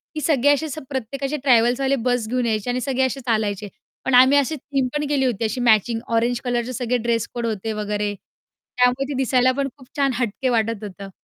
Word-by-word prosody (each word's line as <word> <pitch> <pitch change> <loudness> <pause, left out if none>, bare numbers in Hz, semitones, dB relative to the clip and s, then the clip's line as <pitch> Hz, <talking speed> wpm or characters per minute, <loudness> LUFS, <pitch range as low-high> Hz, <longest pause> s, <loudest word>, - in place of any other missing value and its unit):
की 305 - -3
सगळे 285 -2 +3
असे 290 +2 -1
असं 310 0 -6
प्रत्येकाचे 275 +2 -3
ट्रॅव्हल्सवाले 255 +1 +3
बस 245 -3 +1
घेऊन 250 0 0
यायचे 220 0 -1
आणि 250 +1 -1
सगळे 265 0 0
असे 260 +1 -2
चालायचे, 215 -3 -1 0.4
पण 265 - 0
आम्ही 260 +3 +7
अशी 285 +2 +1
थीम 275 -2 -2
पण 295 0 -1
केली 280 -2 +1
होती 235 -3 -1
अशी 220 +3 -2
मॅचिंग 225 0 +3 0.2
ऑरेंज 235 +1 +1
कलरचे 245 0 -1
सगळे 250 0 0
ड्रेस-कोड 235 0 -2
होते 220 -1 -2
वगैरे. 210 -1 -2
त्यामुळे 250 +6 -3
ते - - -1
दिसायला 255 -1 +3
पण 275 +1 -1
खूप 260 -3 -16
छान, 275 -2 +2
हटके 245 +1 -1
वाटत 225 -2 0
होतं. 200 -1 -8
245 Hz, 200 wpm, -22 LUFS, 225-270 Hz, 0.4 s, आम्ही